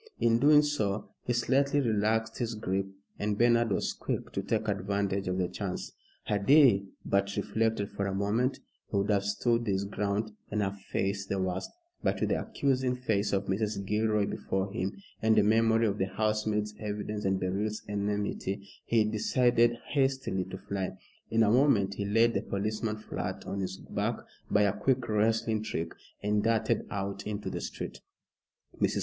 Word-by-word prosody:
In 115 0 +3
doing 150 +2 +7
so, 110 -9 -1 0.2
he 120 - +1
slightly 140 +4 +2
relaxed 110 -2 +1
his 115 -2 -1
grip, 95 -2 -1 0.3
and 105 0 0
Bernard 120 0 +4
was 95 - 0
quick - - -4
to - - -2
take - - -1
advantage 100 0 -1
of 90 0 0
the 90 -1 +1
chance. 90 0 -4 0.3
Had 100 -1 -1
he 130 -10 +6 0.2
but 100 0 +1
reflected 105 0 0
for 100 - -2
a 95 - -2
moment, 110 +7 +1 0.3
he 100 - 0
would 100 +2 +1
have 100 -1 +2
stood 115 +3 +1
his 100 -1 +1
ground 105 +2 -1 0.2
and 105 0 0
have 100 0 -3
faced 95 0 -2
the 100 - 0
worst; 95 0 -2 0.3
but - - 0
with - - 0
the - - +1
accusing 130 -2 0
face 105 -5 0
of 100 0 0
Mrs. 100 0 -1
Gilroy 105 0 +2
before 95 0 -2
him, 95 -1 -2 0.2
and 110 0 +4
a 105 - +6
memory 115 +1 +4
of 105 -1 0
the 95 - +1
housemaid's 105 +1 0
evidence 105 0 -4
and 95 0 +1
Beryl's 100 +4 -2
enmity, 100 -1 -2 0.2
he 115 -2 +3
decided 120 +2 +3
hastily 135 -9 +1
to 95 +1 -7
fly. 100 -1 -4 0.3
In 115 0 +3
a 105 - +4
moment 115 -7 +4
he 100 +1 -3
laid 115 +3 +4
the - - 0
policeman 110 +2 -2
flat 110 - -5
on 100 - -3
his 95 0 -3
back - - -2 0.3
by 105 - +4
a 100 -2 +3
quick 125 +4 +1
wrestling 110 +1 +1
trick, 85 -6 -3 0.3
and 105 0 +2
darted 115 0 +1
out 100 0 -4
into 105 -1 -3
the - - -4
street. - - -6 0.8
Mrs. - - +2
105 Hz, 175 wpm, -30 LUFS, 100-115 Hz, 0.8 s, doing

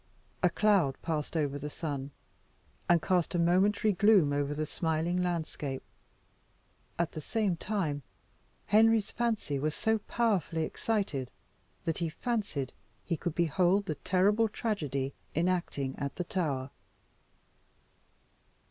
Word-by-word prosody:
A - - +5
cloud 195 -11 +2
passed 160 -1 -2
over 145 -2 0
the 150 +1 -4
sun, 145 -3 -4 0.8
and 170 -2 +5
cast 180 -2 +1
a - - +3
momentary 195 +5 +3
gloom 195 -6 +5
over 145 0 0
the 155 +1 -1
smiling 165 +3 0
landscape. 160 -6 -2 1.1
At 170 -1 0
the 155 - -6
same 205 +2 0
time 165 -6 -2 0.6
Henry's 220 0 +4
fancy 220 -12 -1
was 150 +2 -1
so 220 0 +1
powerfully 200 -8 0
excited, 165 - -1 0.6
that 165 +1 -1
he 170 -2 0
fancied 195 - -2 0.3
he 170 - 0
could 165 0 -3
behold 180 +4 +2
the 155 - -1
terrible 195 +8 +2
tragedy 145 - -2 0.2
enacting 165 -5 0
at 140 -1 -3
the 180 - -2
Tower. 145 -7 -2
170 Hz, 120 wpm, -31 LUFS, 145-200 Hz, 1.1 s, A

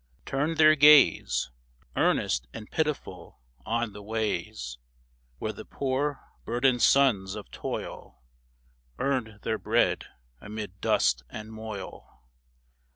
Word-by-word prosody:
Turned 150 +4 -1
their 155 -1 +7
gaze, 140 - +5 0.4
Earnest 65 +1 +1
and 105 - -9
pitiful, 150 - -3 0.3
on 115 -1 -1
the 105 - -9
ways 100 - -3 0.6
Where - - -3
the - - -9
poor, 140 +1 -2 0.2
burdened 125 +1 +1
sons 105 -9 +4
of - - -9
toil - - -6 0.7
Earned 125 -6 -2
their 110 - -1
bread - - +1 0.4
amid 105 -2 -7
dust 60 - +2
and 110 +1 -8
moil. 110 - -8
110 Hz, 105 wpm, -28 LUFS, 100-135 Hz, 0.7 s, their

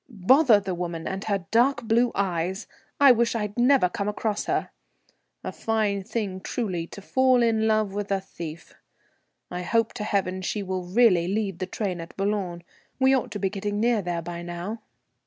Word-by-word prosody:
"Bother 235 - +5
the 190 -2 -4
woman 170 -2 -4
and 190 +1 -4
her 200 -4 -1
dark 245 +5 +3
blue 235 +2 +2
eyes. 190 +1 -1 0.3
I 280 -2 +8
wish 235 -1 +2
I'd 210 -2 -3
never 250 -4 +4
come 200 +2 -4
across 210 0 -2
her. - - -1 0.7
A - - -4
fine 215 -3 -1
thing, 195 -2 -3
truly, 185 -7 -3
to 200 - -11
fall 260 +1 +3
in 220 -1 +2
love 215 -2 +1
with 205 0 -3
a 195 - +2
thief. 165 -4 -9 0.8
I 180 0 -3
hope 225 +5 +1
to 230 - -5
heaven 190 -3 -1
she 200 +2 -2
will 185 -1 -3
really 185 -3 +4
leave 195 -2 -2
the 185 - -3
train 185 -5 -3
at 165 - -11
Boulogne; 195 -4 -2 0.4
we 265 0 +5
ought 260 - -1
to 205 - -5
be 195 -1 -1
getting 205 0 -3
near 230 -1 +2
there 175 -2 -3
by 170 0 -6
now." 175 +6 -6
200 Hz, 185 wpm, -25 LUFS, 180-225 Hz, 0.8 s, I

